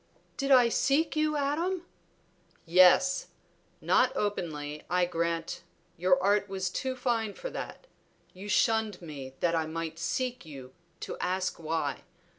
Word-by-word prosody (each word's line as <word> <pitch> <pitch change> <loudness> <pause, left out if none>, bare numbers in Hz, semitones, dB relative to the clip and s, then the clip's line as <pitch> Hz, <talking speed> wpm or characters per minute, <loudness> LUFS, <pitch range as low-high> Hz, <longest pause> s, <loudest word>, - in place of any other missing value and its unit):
"Did 275 -1 -2
I 255 -3 +7
seek 285 +7 +1
you, 305 0 +1
Adam?" 335 +6 -1 0.8
"Yes! 185 +10 +5 0.5
Not - - +3
openly, 150 -7 -3
I 180 +1 +3
grant, 170 -1 -2 0.3
your 180 +1 +3
art 205 0 +2
was 190 -1 -2
too 260 +5 -2
fine 230 -5 -1
for - - -6
that; - - -7 0.5
you 195 +3 -9
shunned 220 -2 +2
me 140 -6 -8
that 170 -1 +2
I 160 -1 0
might 165 0 -5
seek 250 +7 -2
you 135 -5 -11 0.3
to - - -6
ask 185 0 -1
why. 155 -3 -2
185 Hz, 135 wpm, -29 LUFS, 165-250 Hz, 0.8 s, I